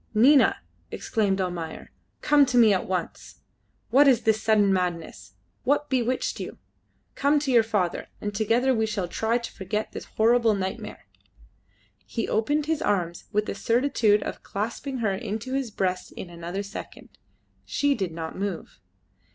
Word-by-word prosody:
"Nina!" 265 Hz, +6 st, +5 dB, 0.3 s
exclaimed 200 Hz, -3 st, -1 dB
Almayer, 175 Hz, -3 st, -4 dB, 0.3 s
"come 295 Hz, -1 st, +5 dB
to 250 Hz, -1 st, +1 dB
me 225 Hz, -3 st, +7 dB
at 185 Hz, -, -1 dB
once. 180 Hz, -3 st, -4 dB, 0.5 s
What 280 Hz, +2 st, +6 dB
is 245 Hz, -4 st, +4 dB
this 220 Hz, -1 st, +2 dB
sudden 210 Hz, -3 st, +3 dB
madness? 175 Hz, -, -3 dB, 0.3 s
What 290 Hz, +2 st, +1 dB
bewitched 255 Hz, 0 st, 0 dB
you? -, -, -6 dB, 0.6 s
Come 285 Hz, +2 st, +2 dB
to 285 Hz, -2 st, 0 dB
your 240 Hz, -2 st, +6 dB
father, 205 Hz, -6 st, -1 dB
and 205 Hz, 0 st, -4 dB
together 230 Hz, +5 st, +2 dB
we 220 Hz, -2 st, +1 dB
shall 200 Hz, -4 st, -2 dB
try 225 Hz, +6 st, 0 dB
to 235 Hz, -, -6 dB
forget 210 Hz, +2 st, -3 dB
this -, -, -7 dB
horrible 230 Hz, 0 st, +3 dB
nightmare!" 190 Hz, -1 st, -5 dB, 1.0 s
He 230 Hz, -, -3 dB
opened 290 Hz, +7 st, +1 dB
his 320 Hz, 0 st, -1 dB
arms 175 Hz, -, -1 dB
with 210 Hz, 0 st, +1 dB
the -, -, -3 dB
certitude 230 Hz, -4 st, +2 dB
of -, -, -6 dB
clasping 230 Hz, +6 st, -4 dB
her 195 Hz, -2 st, 0 dB
to 225 Hz, +5 st, -4 dB
his 270 Hz, -3 st, -1 dB
breast 185 Hz, -3 st, -2 dB
in 175 Hz, -, -8 dB
another 170 Hz, +3 st, -5 dB
second. 200 Hz, -, -9 dB, 0.5 s
She 285 Hz, 0 st, +1 dB
did 190 Hz, -9 st, -2 dB
not 160 Hz, 0 st, -6 dB
move. 195 Hz, -3 st, -5 dB
220 Hz, 155 wpm, -26 LUFS, 190-250 Hz, 1.0 s, me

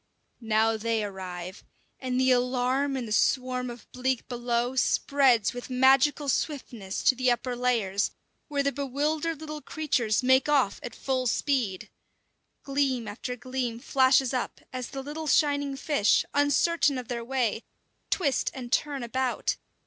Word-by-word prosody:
Now 220 Hz, -1 st, +2 dB
they 225 Hz, 0 st, -1 dB
arrive, 185 Hz, -2 st, -7 dB, 0.4 s
and 255 Hz, -1 st, -2 dB
the 260 Hz, 0 st, +4 dB
alarm 255 Hz, +2 st, +1 dB
in 250 Hz, -, -3 dB
the 215 Hz, -, -8 dB
swarm 250 Hz, +3 st, +1 dB
of 240 Hz, 0 st, -10 dB
bleak 255 Hz, 0 st, -2 dB
below 240 Hz, 0 st, -1 dB
spreads 260 Hz, -3 st, +3 dB
with 245 Hz, +1 st, -7 dB
magical 265 Hz, +3 st, +4 dB
swiftness 245 Hz, -8 st, -2 dB
to 260 Hz, -, +5 dB
the 255 Hz, 0 st, +1 dB
upper 245 Hz, +1 st, 0 dB
layers, 225 Hz, -5 st, +1 dB, 0.4 s
where 285 Hz, -2 st, -1 dB
the 280 Hz, -, +1 dB
bewildered 295 Hz, +4 st, -2 dB
little 305 Hz, -1 st, -7 dB
creatures 255 Hz, -9 st, 0 dB
make 260 Hz, +3 st, +4 dB
off 270 Hz, -9 st, +2 dB
at 240 Hz, -, -7 dB
full 260 Hz, -2 st, -1 dB
speed. 240 Hz, -8 st, -1 dB, 0.7 s
Gleam 270 Hz, -4 st, 0 dB
after 235 Hz, +4 st, -5 dB
gleam 250 Hz, -1 st, -3 dB
flashes 260 Hz, +1 st, +3 dB
up 255 Hz, -, -3 dB
as 255 Hz, -1 st, -4 dB
the 270 Hz, -1 st, -6 dB
little 305 Hz, +3 st, -6 dB
shining 285 Hz, -1 st, +2 dB
fish, 275 Hz, -7 st, +2 dB
uncertain 290 Hz, +1 st, +2 dB
of 250 Hz, -2 st, -6 dB
their 235 Hz, -1 st, -4 dB
way, 240 Hz, -3 st, -1 dB, 0.5 s
twist 290 Hz, -8 st, +1 dB
and 245 Hz, -2 st, -7 dB
turn 285 Hz, -3 st, 0 dB
about. 255 Hz, +2 st, -1 dB
255 Hz, 145 wpm, -27 LUFS, 235-280 Hz, 0.7 s, to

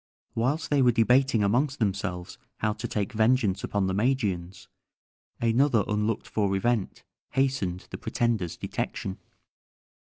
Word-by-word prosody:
Whilst 140 Hz, +9 st, -1 dB
they 145 Hz, -2 st, +4 dB
were 125 Hz, -1 st, +5 dB
debating 125 Hz, 0 st, +3 dB
amongst 130 Hz, +8 st, +1 dB
themselves 95 Hz, -4 st, -2 dB, 0.2 s
how 105 Hz, -1 st, 0 dB
to -, -, -5 dB
take 100 Hz, -2 st, -2 dB
vengeance 110 Hz, -3 st, +2 dB
upon 100 Hz, -2 st, 0 dB
the 95 Hz, -, -1 dB
Magians, 100 Hz, -6 st, -1 dB, 0.7 s
another 115 Hz, 0 st, +3 dB
unlooked 105 Hz, +1 st, -1 dB
for 100 Hz, -3 st, 0 dB
event 110 Hz, 0 st, -1 dB, 0.3 s
hastened 130 Hz, -10 st, 0 dB
the -, -, -6 dB
pretender's 110 Hz, -8 st, -1 dB
detection. 95 Hz, -1 st, -4 dB
110 Hz, 125 wpm, -27 LUFS, 100-125 Hz, 0.7 s, were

